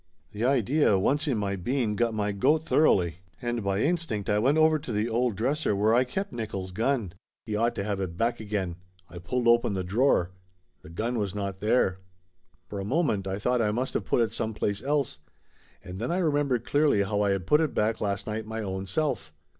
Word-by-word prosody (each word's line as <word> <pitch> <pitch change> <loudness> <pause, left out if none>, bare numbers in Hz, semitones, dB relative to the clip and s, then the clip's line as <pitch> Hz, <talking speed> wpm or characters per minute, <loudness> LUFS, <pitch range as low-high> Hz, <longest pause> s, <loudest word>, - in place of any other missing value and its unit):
The 105 +1 -4
idea, 130 -2 +3
once 145 - +1
in 130 -6 +1
my 100 -1 -1
bean, 110 +3 -1
got 115 0 0
my 105 -1 0
goat 150 +11 +2
thoroughly, 90 - +3 0.2
and 120 -3 -2
by 100 +1 0
instinct 145 - -1
I 105 - +3
went 135 +7 +3
over 155 0 +4
to 140 -4 -7
the 105 +1 0
old 120 -1 0
dresser 130 +2 0
where 105 +3 +3
I 125 +2 +4
kept 190 +6 -4
Nickolls' 100 -5 -5
gun. 115 -3 0 0.3
He 110 -3 -3
ought 115 +3 +1
to 100 - -2
have 100 -1 -2
it 90 -3 -4
back 115 +3 0
again. 100 -5 -3 0.3
I 85 - -8
pulled 120 +7 -1
open 120 -3 +4
the 95 - -2
drawer. 95 -2 +2 0.5
The - - -13
gun 115 +8 -2
was 100 -2 -2
not 100 -2 -4
there. 105 -3 +2 0.7
For 100 - -6
a - - -3
moment 105 - 0
I 95 0 -2
thought 125 +3 +1
I 105 - +2
must 120 +5 -2
of - - 0
put - - +2
it 115 -2 +1
some 110 0 -3
place 100 -1 -1
else, 140 - -1 0.6
and 90 +1 -8
then 120 +8 -2
I 175 - 0
remembered 145 -8 +1
clearly 145 -7 +3
how 105 +1 -1
I 100 - +2
had 95 -3 -1
put 150 +9 +4
it 155 -4 -1
back 110 +1 0
last 100 -1 -1
night 110 0 -4
my 110 0 -4
own 95 -1 -4
self. 95 - -1
110 Hz, 215 wpm, -27 LUFS, 100-125 Hz, 0.7 s, over